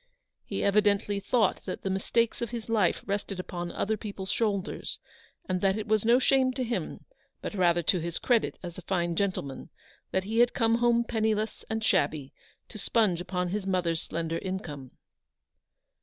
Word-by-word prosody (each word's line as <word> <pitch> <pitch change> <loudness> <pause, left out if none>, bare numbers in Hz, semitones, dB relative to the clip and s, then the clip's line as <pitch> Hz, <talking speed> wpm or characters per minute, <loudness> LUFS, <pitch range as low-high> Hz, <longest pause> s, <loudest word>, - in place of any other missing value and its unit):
He - - -3
evidently 205 0 +3
thought 205 0 +1
that - - -5
the 195 - -1
mistakes 230 +4 +1
of 235 - -1
his 235 -2 -6
life 210 -6 +2
rested 200 -1 -3
upon 175 -1 -4
other 220 +1 -1
people's 200 -2 -5
shoulders; 205 -5 -1 0.5
and 185 -1 -1
that 195 +1 +2
it 215 - -3
was 215 -1 +2
no 235 +2 +5
shame 260 0 +3
to 255 - -2
him, 235 -1 -3 0.3
but - - -5
rather 175 -3 +3
to 180 - +3
his 170 +1 -3
credit 240 -3 +1
as 175 0 -7
a - - -8
fine 175 -2 -1
gentleman, 175 -8 -2 0.4
that 190 - 0
he 220 +4 -1
had 240 0 +4
come 230 0 +3
home 235 0 +4
penniless 220 -2 -1
and 220 0 -2
shabby 150 -9 +1 0.4
to 215 - -9
sponge 205 -6 +2
upon 180 0 -2
his 195 +1 -3
mother's 175 -4 +1
slender 165 0 -3
income. 160 -9 -5
200 Hz, 170 wpm, -28 LUFS, 180-220 Hz, 0.5 s, no